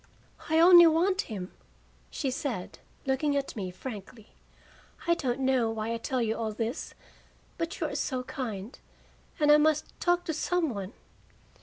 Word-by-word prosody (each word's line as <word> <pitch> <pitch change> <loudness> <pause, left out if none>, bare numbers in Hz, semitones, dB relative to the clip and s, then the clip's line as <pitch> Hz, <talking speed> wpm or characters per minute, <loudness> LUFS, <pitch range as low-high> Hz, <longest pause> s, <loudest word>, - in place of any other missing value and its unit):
"I 320 +1 +3
only 345 0 +9
want 365 +5 +2
him," 195 -4 -5 0.6
she 270 - -2
said, 250 -8 -4 0.3
looking 270 +2 +1
at 275 - -3
me 195 -4 -4
frankly. 210 +2 -9 0.7
"I 340 - +4
don't 270 -5 -2
know 260 -3 +2
why 225 0 -3
I - - -1
tell 250 +1 -1
you 220 0 0
all 225 -1 -2
this, 230 +4 -4 0.6
but 330 +3 -3
you - - 0
are - - -3
so 255 -2 -2
kind, 230 -4 -6 0.6
and 295 -1 +5
I 300 - +8
must 305 0 +1
talk 350 0 +2
to 320 - -2
some 330 0 0
one." 200 +1 -6
265 Hz, 160 wpm, -29 LUFS, 225-315 Hz, 0.7 s, only